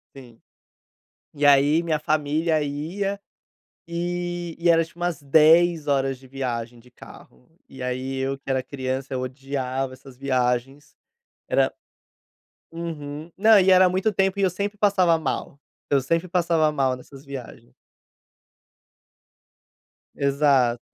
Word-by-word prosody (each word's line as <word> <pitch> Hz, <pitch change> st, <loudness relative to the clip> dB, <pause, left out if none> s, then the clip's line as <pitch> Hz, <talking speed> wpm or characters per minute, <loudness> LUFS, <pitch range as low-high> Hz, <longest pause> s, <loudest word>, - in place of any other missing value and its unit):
Sim. 120 Hz, -4 st, -14 dB, 0.9 s
E 145 Hz, 0 st, -1 dB
aí, 145 Hz, +3 st, +5 dB
minha 160 Hz, -3 st, 0 dB
família 155 Hz, +1 st, 0 dB
ia, 175 Hz, +8 st, -3 dB, 0.7 s
eh, 175 Hz, 0 st, -4 dB
e 170 Hz, +1 st, +1 dB
era 165 Hz, 0 st, +5 dB
tipo 170 Hz, +1 st, -21 dB
umas 175 Hz, -4 st, -2 dB
10 160 Hz, +3 st, +4 dB
horas 135 Hz, -2 st, +1 dB
de 130 Hz, -, -18 dB
viagem 120 Hz, -3 st, -4 dB
de 125 Hz, +2 st, -20 dB
carro, 125 Hz, 0 st, -16 dB, 0.2 s
e 130 Hz, -1 st, -9 dB
aí 130 Hz, +1 st, -3 dB
eu 135 Hz, +1 st, -2 dB
que 135 Hz, -, -12 dB
era 130 Hz, -1 st, 0 dB
criança, 130 Hz, 0 st, -4 dB
eu 130 Hz, -, -1 dB
odiava 130 Hz, 0 st, -3 dB
essas 130 Hz, 0 st, -14 dB
viagens, 135 Hz, +2 st, -1 dB, 0.5 s
era -, -, +2 dB, 1.0 s
uhum. 160 Hz, -2 st, -6 dB
Não 215 Hz, +2 st, +6 dB
e 190 Hz, 0 st, +4 dB
era 185 Hz, 0 st, +7 dB
muito 185 Hz, +4 st, 0 dB
tempo 195 Hz, 0 st, 0 dB
e -, -, +1 dB
eu 190 Hz, -, +4 dB
sempre 200 Hz, +3 st, -4 dB
passava 190 Hz, -5 st, +3 dB
mal 140 Hz, -2 st, -4 dB, 0.3 s
eu 140 Hz, -, +4 dB
sempre 165 Hz, +6 st, -1 dB
passava 170 Hz, -3 st, +2 dB
mal 135 Hz, -4 st, 0 dB
nessas 135 Hz, +2 st, -14 dB
viagens. 135 Hz, -, -10 dB, 2.4 s
Exato. 140 Hz, -4 st, +2 dB
145 Hz, 130 wpm, -24 LUFS, 135-170 Hz, 2.4 s, era